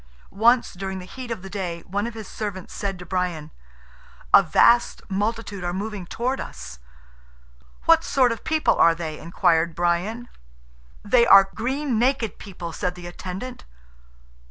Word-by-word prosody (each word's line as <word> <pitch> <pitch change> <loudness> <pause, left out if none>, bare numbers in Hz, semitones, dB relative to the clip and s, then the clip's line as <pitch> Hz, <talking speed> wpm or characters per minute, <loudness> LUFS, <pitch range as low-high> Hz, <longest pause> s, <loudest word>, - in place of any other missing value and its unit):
Once 235 +4 +3
during 190 +1 -5
the 180 - -8
heat 250 +6 -9
of 225 -5 -5
the - - -7
day 180 -4 -4
one 200 +5 -3
of 235 - -7
his 220 -3 -8
servants 200 -4 -6
said 195 -2 -3
to 180 - -10
Brian, 175 -4 -3 0.8
"A - - +10
vast 240 0 +3
multitude 205 -1 -2
are 175 0 -2
moving 200 -2 -5
towards 255 +7 -2
us." 60 - -9 1.1
"What 330 -1 +5
sort 255 -6 +2
of 230 - -5
people 315 0 +2
are 165 0 +5
they?" 160 -2 -5
inquired 170 -1 +1
Brian. 180 +8 -1 0.8
"They 235 +3 +4
are 195 0 +7
green 260 +1 -1
naked 245 -3 0
people." 175 -4 -8
said 180 +2 -2
the 175 -1 -10
attendant. 185 +7 -7
195 Hz, 155 wpm, -23 LUFS, 180-235 Hz, 1.1 s, A